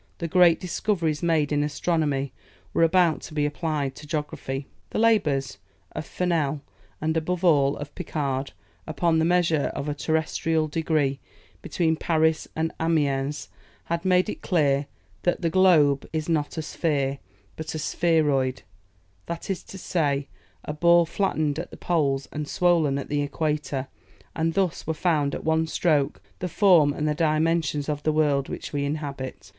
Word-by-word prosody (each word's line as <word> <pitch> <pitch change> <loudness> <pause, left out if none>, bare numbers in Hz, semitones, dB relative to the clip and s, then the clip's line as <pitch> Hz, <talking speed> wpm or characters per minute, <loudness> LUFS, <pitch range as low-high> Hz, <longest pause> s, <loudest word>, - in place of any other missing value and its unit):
The 170 - -3
great 175 -1 +5
discoveries 170 -4 -1
made 160 -4 +1
in 145 0 +2
astronomy 150 -2 -1 0.4
were - - +1
about 165 -1 +4
to 155 - -10
be 150 -1 +1
applied 150 -2 -2
to 150 - -11
geography. 145 -3 -4 0.2
The - - -4
labours 150 - +2 0.3
of - - -6
Fernel 155 -5 -1 0.4
and 160 +1 -1
above 175 +3 -1
all 145 -4 +4
of 145 0 -7
Picard, 140 -6 -3 0.3
upon 160 +1 +1
the 160 - +2
measure 170 -4 +2
of 140 - -4
a 150 - -1
terrestrial 160 +2 0
degree 150 -3 0 0.4
between 160 -2 0
Paris 160 -1 +1
and 160 0 -1
Amiens, 145 -3 0 0.3
had 170 0 -3
made 185 0 +3
it - - -5
clear 145 -5 +1 0.3
that 175 - 0
the 165 - +1
globe 160 -7 +4
is 155 -1 -2
not 155 -3 -1
a 160 - -2
sphere, 140 -4 -1 0.4
but 160 0 -6
a - - -1
spheroid, 150 -5 +1 0.6
that 170 +3 -4
is 190 - -3
to 195 - -10
say, 145 -6 -1 0.4
a 150 - -3
ball 170 +2 +5
flattened 155 -4 -1
at 175 - -5
the - - -11
poles 140 -6 0
and 150 0 -4
swollen 170 -6 +2
at 140 - -4
the 145 0 0
equator, 145 -2 -2 0.5
and 165 0 0
thus 190 -6 0
were 160 - -1
found 155 -5 +1
at - - -6
one 160 0 +1
stroke 155 -4 +1 0.2
the 180 - -3
form 170 -6 +5
and 150 +1 -2
the 150 - +2
dimensions 155 -1 +1
of 150 -1 -2
the 155 - +1
world 145 -3 +1
which - - -6
we 145 -1 0
inhabit. 140 -9 -5
155 Hz, 160 wpm, -25 LUFS, 145-165 Hz, 0.6 s, great